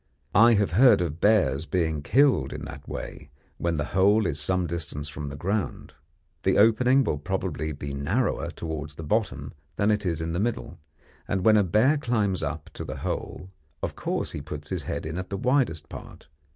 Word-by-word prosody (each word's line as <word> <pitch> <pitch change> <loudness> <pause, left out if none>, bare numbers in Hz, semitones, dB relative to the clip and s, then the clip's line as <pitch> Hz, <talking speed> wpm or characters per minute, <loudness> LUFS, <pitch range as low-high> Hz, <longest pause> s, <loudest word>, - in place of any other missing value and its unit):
I 115 +4 +7
have 100 -1 +1
heard 125 +8 +6
of 85 -2 -3
bears 80 -9 +3
being 80 -5 0
killed 135 - +3
in - - -6
that - - -10
way, 75 - -7 0.3
when 85 -1 0
the 75 - -1
hole 100 +3 +4
is 75 -4 -1
some 90 +5 0
distance 75 -3 -5
from 75 -1 -6
the 70 - -7
ground. 95 +7 -3 0.5
The - - +2
opening 125 +5 +5
will 75 - -1
probably 85 -2 -3
be 70 -1 -6
narrower 70 +1 -1
towards 80 -2 -6
the 80 - -7
bottom 75 - -1 0.2
than 105 +1 +2
it 105 0 0
is 85 -4 -1
in 80 0 -3
the 85 - -1
middle, 110 -5 -3 0.5
and 95 -1 -1
when 110 -1 +7
a 105 - +5
bear 110 - +3
climbs 110 -8 0
up 80 0 -4
to - - -6
the - - -6
hole, 90 - -4 0.3
of - - -3
course - - -2
he 75 - -5
puts 75 0 -8
his 90 -3 -1
head - - -3
in 80 +3 -4
at 95 - -6
the 100 - -3
widest 120 - +1
part. - - -11
90 Hz, 195 wpm, -26 LUFS, 75-105 Hz, 0.5 s, I